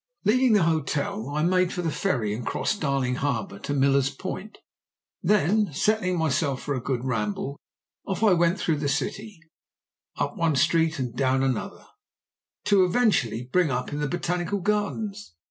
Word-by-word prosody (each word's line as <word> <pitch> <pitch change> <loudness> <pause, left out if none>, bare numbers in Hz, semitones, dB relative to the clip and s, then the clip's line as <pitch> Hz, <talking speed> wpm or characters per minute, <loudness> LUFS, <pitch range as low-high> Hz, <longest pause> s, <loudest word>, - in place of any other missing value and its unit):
"Leaving 250 +3 +4
the 205 -4 +4
hotel 150 -6 -1
I 150 +2 -1
made 180 +1 +2
for 180 - -3
the 165 - 0
ferry 120 - -1
and 115 +3 -5
crossed 210 - -2
Darling 135 -3 0
Harbour 115 -8 -2
to - - -5
Millers 140 -1 +3
Point; 185 +8 -7 0.6
then, 210 0 +2
setting 185 +2 +1
myself 140 -4 0
for 145 - -2
a 130 - -3
good 130 0 -2
ramble, 115 +3 -2 0.5
off 195 +2 -2
I 210 -4 +6
went 170 +1 +2
through 160 -3 0
the 145 -1 -1
city, 200 +7 -3 0.8
up - - -2
one 165 -5 +1
street 160 +3 +2
and 125 -3 -4
down 130 0 +1
another, 130 -4 -2 0.8
to 200 -2 +4
eventually 180 - +1
bring 180 -4 +3
up 125 +1 -2
in 145 - -3
the 150 - 0
botanical 175 +4 -1
gardens. 205 - -2
160 Hz, 165 wpm, -25 LUFS, 135-195 Hz, 0.8 s, I